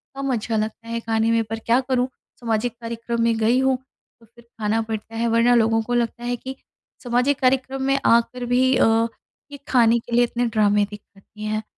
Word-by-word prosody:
कम 275 0 -2
अच्छा 225 -1 -2
लगता 215 +1 -4
है 230 0 -3
खाने 225 0 0
में। 230 0 +2
पर 225 +1 -6
क्या 230 +2 +2
करूँ, 255 -1 0 0.3
सामाजिक 230 0 -1
कार्यक्रम 230 0 -3
में 230 -1 +2
गई 225 +3 +2
हूँ 265 0 +2 0.4
तो 230 - -20
फिर 235 +2 -20 0.2
खाना 215 +1 0
पड़ता 225 0 -6
है। 230 +1 0
वरना 230 +1 +3
लोगों 225 -1 +3
को 245 - -4
लगता 235 0 -1
है 245 0 -1
कि 260 +2 -8 0.5
सामाजिक 250 +3 +1
कार्यक्रम 265 +1 +1
में 275 +1 +1
आकर 235 +2 +2
भी 255 +2 +2
अ, - - +4 0.7
ये 285 - -8
खाने 235 -2 +4
के 235 - -14
लिए 240 - +5
इतने 240 0 -1
ड्रामे 210 -2 +2
देख 210 - -8
सकती 205 +2 -15
हैं। 215 0 -2
235 Hz, 205 wpm, -22 LUFS, 225-245 Hz, 0.7 s, लिए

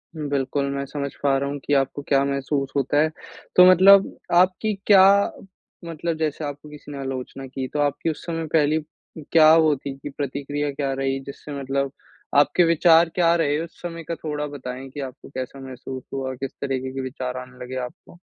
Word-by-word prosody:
बिल्कुल, 140 -2 -1
मैं 140 0 -3
समझ 140 0 -4
पा 135 -1 +3
रहा 140 +1 -2
हूँ 145 0 -4
कि 145 - 0
आपको 135 +1 +1
क्या 140 -1 +3
महसूस 140 0 -2
होता 140 +1 +1
है। 155 - +2 0.5
तो 180 - +9
मतलब 195 +2 +6 0.2
आपकी 190 +4 +1
क्या 190 -2 +8 0.8
मतलब 165 0 -3
जैसे 155 -1 -2
आपको 145 +1 -7
किसी 150 0 -11
ने 140 - -6
आलोचना 135 0 -5
की 130 0 -5
तो 150 - -1
आपकी 145 +3 0
उस 155 - -6
समय 165 -1 -3
पहली 155 0 +3 0.5
क्या 155 -1 +7
होती 150 -4 +3
थी 145 - -7
प्रतिक्रिया 145 +1 -3
क्या 140 -1 -2
रही 135 0 -1
जिससे 140 +1 -8
मतलब 135 0 -1 0.5
आपके 145 +5 +5
विचार 165 0 +5
क्या 170 -2 +4
रहे 150 -2 +1
उस 170 - -13
समय 170 -1 -6
का 165 +1 -4
थोड़ा 150 -2 -4
बताएँ 130 -2 -7
कि 145 - -9
आपको 130 -1 -8
कैसा 130 0 -6
महसूस 130 0 -8
हुआ, 130 -1 -3
किस 135 +1 -5
तरीके 130 -1 -2
के 135 - -3
विचार 130 -1 -5
आने 125 0 -9
लगे 130 +1 -7
आपको? 170 +7 -14
145 Hz, 185 wpm, -23 LUFS, 135-155 Hz, 0.8 s, तो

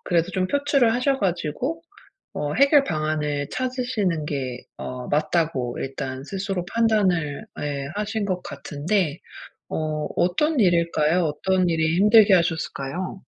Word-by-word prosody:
그래도 170 +1 +1
좀 185 -1 0
표출을 280 -2 +2
하셔 265 +3 +1
가지고 195 - -2 0.5
어 145 0 -2
해결 280 +1 +5
방안을 155 - -1
찾으시는 245 - -1
게 130 -4 -4
어 125 -1 -6
맞다고 150 -5 0
일단 135 0 -5
스스로 195 0 -3
판단을 190 -10 +1
예. 140 -2 -3
하신 210 0 -2
것 185 -2 -2
같은데 150 +4 -2 0.5
어 155 -1 -2
어떤 280 - +1
일일까요? 170 -2 +2
어떤 180 +4 +1
일이 160 0 +1
힘들게 210 0 +6
하셨을까요? 170 +1 -2
175 Hz, 275 characters per minute, -23 LUFS, 150-210 Hz, 0.5 s, 힘들게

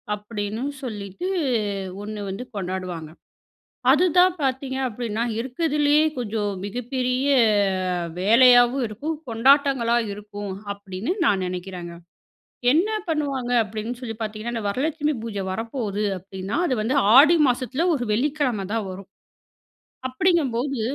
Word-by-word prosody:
அப்பிடின்னு 210 +2 -5 0.2
சொல்லிட்டு 210 - -5 0.7
ஒண்ணு 210 +1 -6
வந்து 195 +6 -5
கொண்டாடுவாங்க. 185 -4 -4 0.8
அதுதான் 360 +3 +4
பார்த்தீங்க 265 0 -1
அப்பிடின்னா, 230 -1 -3 0.2
இருக்கிறதிலேயே 295 +3 +2
கொஞ்சம் 210 -3 -2
மிகப்பெரிய 250 +4 -2 0.9
வேலையாவும் 245 +4 +6
இருக்கும். 290 +10 -4
கொண்டாட்டங்களா 260 0 +3 0.2
இருக்கும், 205 -1 -7 0.2
அப்பிடின்னு 200 - -4
நான் 190 -2 +2
நெனைக்கிறங்க. 180 -1 -6 0.8
என்ன 345 +8 +3 0.2
பண்ணுவாங்க 280 -6 -1
அப்பிடின்னு 220 +3 -5
சொல்லி 225 -3 -5
பார்த்தீங்கன்னா, 215 +2 -4
அந்த 225 - -3
வரலட்சுமி 295 +6 -1
பூஜ 225 -3 -5
வரப்போது 220 -1 -3 0.2
அப்பிடின்னா, 190 - -4
அது 255 - +1
வந்து 260 +6 +1 0.2
ஆடி 315 +5 +8
மாசத்துல 255 +6 -1
ஒரு 245 -4 -2
வெள்ளிக்கிழம 255 -5 0
தான் 225 -3 -1
வரும். 190 +1 -10 1.0
அப்பிடிங்கம்போது, 270 -4 +1
235 Hz, 105 wpm, -23 LUFS, 205-275 Hz, 1.0 s, ஆடி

